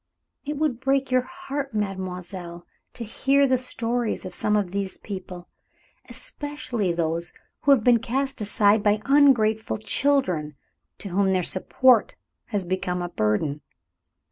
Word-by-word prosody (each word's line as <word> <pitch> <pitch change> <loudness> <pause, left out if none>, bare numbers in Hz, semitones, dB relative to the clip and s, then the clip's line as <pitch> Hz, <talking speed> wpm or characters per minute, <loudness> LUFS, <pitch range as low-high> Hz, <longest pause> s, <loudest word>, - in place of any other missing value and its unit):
It 295 0 -3
would 290 -6 0
break 270 0 0
your 255 0 +4
heart, 280 -4 -6
mademoiselle, 180 -3 -5 0.3
to 240 - -6
hear 275 +5 +2
the 255 -2 +2
stories 240 -2 -2
of 185 - -6
some 210 - +1
of 200 -4 0
these 195 -1 -2
people, 185 -3 -8 0.6
especially 290 - -3
those 170 0 -2 0.3
who 285 - +3
have 260 -6 +5
been 240 -1 +5
cast 265 +2 -2
aside 210 0 +3
by 210 +1 +1
ungrateful 245 -6 +3
children, 210 - +1 0.4
to 200 - -7
whom 190 +1 +2
their 185 -1 +1
support 240 +7 +3 0.3
has 205 -5 -2
become 180 0 -2
a 175 - -4
burden. 140 +2 -1
215 Hz, 140 wpm, -24 LUFS, 185-265 Hz, 0.6 s, have